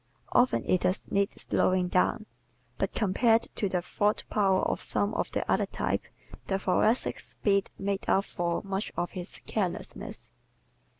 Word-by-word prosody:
Often 250 +1 +3
it 185 - +2
does 185 - 0
need 200 0 0
slowing 185 -1 +2
down. 185 +4 +1 0.5
But - - -1
compared 225 +2 +3
to 200 - -1
the 180 -2 -1
thought 205 +3 0
power 195 -3 +3
of - - 0
some 205 +1 0
of - - -1
the - - -2
other - - +2
types - - -2 0.4
the 195 - +1
Thoracic's 205 +5 +1
speed 200 -2 +1
makes 200 0 -2
up 195 - +3
for 170 -1 -2
much 195 +1 -3
of 175 - -1
his 180 -1 -5
carelessness. 190 -5 -4
195 Hz, 155 wpm, -29 LUFS, 185-210 Hz, 0.5 s, Often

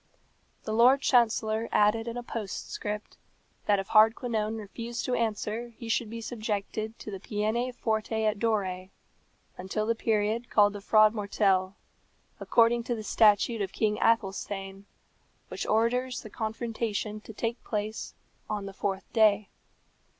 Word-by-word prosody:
The 215 - -3
Lord 250 +5 +5
Chancellor 225 -3 +2
added 220 +2 +3
in 235 +1 -4
a 245 - -4
postscript 210 -1 -5 0.5
that 205 - +4
if 195 -1 -4
Hardquanonne 220 0 +3
refused 230 +3 -5
to 255 - -1
answer 230 +1 -2
he 230 -2 -8
should 225 0 0
be 230 +1 -6
subjected 220 -1 -4
to 210 - -8
the 195 - -6
peine 220 +5 -1
forte 220 -2 -1
et 215 -1 +1
dure, 190 -5 -1 0.7
until 190 +4 -2
the 230 - +2
period 220 +1 0
called 205 -1 +4
the 205 - -7
frodmortell, 200 -3 +3 0.6
according 235 +1 +3
to 240 - -1
the 220 - -6
statute 215 +1 +3
of 195 -1 -3
King 210 -1 0
Athelstane, 195 -2 -1 0.6
which - - -5
orders 245 +3 +1
the 215 - -10
confrontation 220 -1 -3
to 220 - -10
take 230 +2 -3
place 215 0 -4 0.3
on 210 -2 -3
the 195 - -7
fourth 195 0 -3
day. 215 -2 +4
215 Hz, 140 wpm, -28 LUFS, 205-230 Hz, 0.7 s, Lord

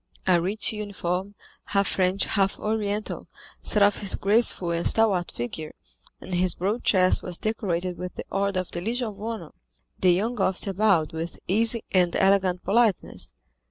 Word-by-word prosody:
A 180 -2 +3
rich 205 +5 -1
uniform, 200 -2 -4 0.3
half 200 -1 +1
French, 185 +1 +1
half 195 -2 +1
Oriental, 210 -1 -3 0.3
set 210 - +3
off 200 0 +3
his 200 -2 0
graceful 200 -4 +2
and 170 0 0
stalwart 200 -6 +2
figure, 155 +6 -6 0.4
and 190 - -8
his 180 0 +2
broad 205 +6 -2
chest 185 -2 +3
was 180 -2 -4
decorated 185 -5 -2
with 180 0 -6
the - - -7
order 195 -1 0
of 185 - -11
the 175 - -4
Legion 235 +4 -2
of 205 -1 -12
Honor. 225 0 -6 0.5
The 185 - +4
young 220 +7 0
officer 190 +1 +2
bowed 185 -5 +2
with 165 +1 -6
easy 225 +4 +4
and 180 -2 +2
elegant 190 -2 +2
politeness. 220 -2 0
195 Hz, 160 wpm, -25 LUFS, 180-210 Hz, 0.5 s, The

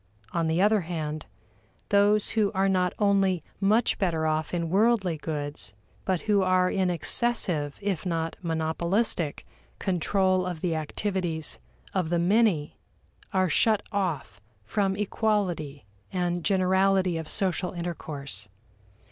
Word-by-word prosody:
On 165 -1 0
the 160 +2 +1
other 210 +1 +4
hand, 155 -3 -4 0.6
those 205 0 +3
who 215 -3 +1
are 190 0 +2
not 185 -2 +2
only 195 -4 +2 0.2
much 215 +4 +2
better 165 -5 0
off 155 0 0
in 170 -2 -2
worldly 200 -3 +3
goods, 145 -9 -4 0.3
but 185 -3 0
who 205 -2 +2
are 185 -1 +3
in 190 -2 +1
excessive, 175 - +1
if 195 -5 -1
not 165 -2 -2
monopolistic, 170 +2 0 0.3
control 185 0 +1
of 175 -3 -5
the 175 -2 0
activities 160 - -2 0.3
of 180 -4 0
the 175 - +1
many 180 -3 +2 0.5
are 185 -2 +2
shut 215 +6 +3
off 165 - -2 0.2
from 195 - 0
equality 190 - -1 0.3
and 175 -2 -1
generality 190 -1 +2
of 160 - -7
social 180 -2 0
intercourse. 145 - -4
180 Hz, 125 wpm, -27 LUFS, 160-195 Hz, 0.6 s, other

